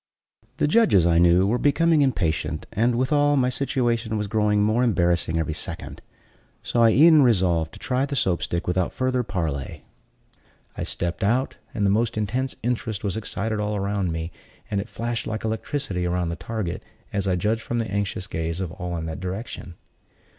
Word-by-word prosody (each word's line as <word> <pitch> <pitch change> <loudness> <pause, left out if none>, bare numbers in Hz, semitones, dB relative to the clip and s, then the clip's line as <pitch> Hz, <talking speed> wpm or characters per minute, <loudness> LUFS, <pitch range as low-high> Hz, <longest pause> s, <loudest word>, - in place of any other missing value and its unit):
The - - +2
judges, 155 - +4
I 85 -1 +4
knew, 85 +2 +5
were 115 +5 +1
becoming 160 +2 +3
impatient, 80 - 0
and, 115 +3 +2
withal, 145 +3 +2
my 125 -1 +3
situation 120 -4 0
was 105 - -1
growing 105 0 +2
more 110 +4 +2
embarrassing 85 -6 +1
every 80 -1 -1
second; 85 +1 -7 0.6
so 120 - 0
I 115 - +7
e'en 155 +6 +7
resolved 90 - +2
to - - -11
try 135 0 0
the 140 - -3
Soap 95 -9 +1
stick 85 0 -2
without 90 0 0
further 130 -1 0
parley. 80 - -4 0.9
I - - -5
stepped 85 +1 -3
out, 125 +6 +1
and 105 - -1
the 100 - +3
most 115 +2 +1
intense 125 +6 -1
interest 115 -3 -2
was 100 -2 -1
excited 110 0 -3
all 105 0 -1
around 100 -2 -1
me, 80 +1 -4 0.4
and 100 -1 +1
it 105 - -9
flashed 120 +1 -3
like 110 0 -3
electricity 110 -4 -2
around 90 -1 -1
the 85 - -3
target, 105 -4 -4 0.3
as 100 -1 -1
I 95 - +2
judged 105 +6 0
from 120 - -3
the 115 -4 -2
anxious 100 -2 -2
gaze 80 -1 -3
of 95 -4 -3
all 90 -1 -4
in 80 - -4
that 80 0 -5
direction. 95 -1 -6
105 Hz, 185 wpm, -24 LUFS, 90-120 Hz, 0.9 s, I